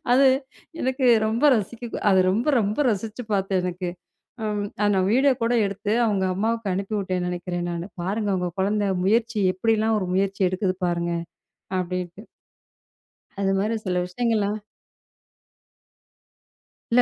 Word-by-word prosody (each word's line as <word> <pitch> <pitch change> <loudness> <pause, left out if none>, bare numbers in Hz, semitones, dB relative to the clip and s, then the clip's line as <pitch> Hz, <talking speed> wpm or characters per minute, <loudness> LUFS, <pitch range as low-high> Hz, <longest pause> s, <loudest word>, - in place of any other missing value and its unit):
அது 270 +2 +6 0.6
எனக்கு 260 0 +1 0.2
ரொம்ப 225 +6 0
ரசிக்க 230 +3 -4 0.2
அத 190 - +5
ரொம்ப 230 +10 0
ரொம்ப 210 +3 -1
ரசிச்சு 220 +3 -3
பார்த்தேன் 195 -2 +1
எனக்கு. 180 0 -3 0.5
அம், 210 -1 -1 0.2
அத 205 - +3
நான் 185 0 +2
வீடியோ 270 +3 +5
கூட 230 +1 +2
எடுத்து 200 +1 -3
அவங்க 200 -4 +1
அம்மாவுக்கு 225 0 -1
அனுப்பிவுட்டேன் 190 -2 -2
நெனைக்கிறேன் 175 0 -3
நானு. 170 +2 -4 0.2
பாருங்க 205 +3 -1
உங்க 180 -1 -1
குழந்தை 205 +1 +1 0.2
முயற்சி 225 +2 +2
எப்டிலாம் 220 +2 +1
ஒரு 185 - -3
முயற்சி 195 +1 0
எடுக்குது 185 0 -1
பாருங்க 170 0 -1 0.7
அப்டின்ட்டு. 180 +2 -5 1.1
அது 195 0 +2
மாதிரி 215 +3 0
சில 180 -1 0
விஷயங்கள்லாம். 210 +1 0 2.3
இல்ல, 245 +1 +6
200 Hz, 125 wpm, -24 LUFS, 185-225 Hz, 2.3 s, அது